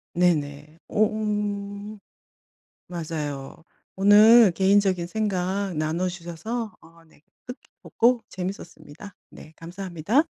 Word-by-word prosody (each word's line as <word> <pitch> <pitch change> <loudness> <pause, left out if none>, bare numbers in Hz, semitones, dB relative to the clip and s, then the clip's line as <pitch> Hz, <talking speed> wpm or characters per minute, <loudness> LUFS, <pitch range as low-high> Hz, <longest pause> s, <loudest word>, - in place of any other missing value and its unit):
네네. 150 -3 0
오 215 0 +3
음. 205 -1 -4 0.9
맞아요. 155 -5 -6 0.3
오늘 210 +3 +7
개인적인 190 -1 +2
생각 195 -2 -2
나눠 160 +4 -1
주셔서 185 +6 -5
어 165 0 -20
네 160 -2 -25 0.3
뜻깊었고 250 -1 -1
재밌었습니다. 180 -1 -8 0.2
네 155 - -14
감사합니다. 185 - -1
185 Hz, 220 characters per minute, -24 LUFS, 165-210 Hz, 0.9 s, 오늘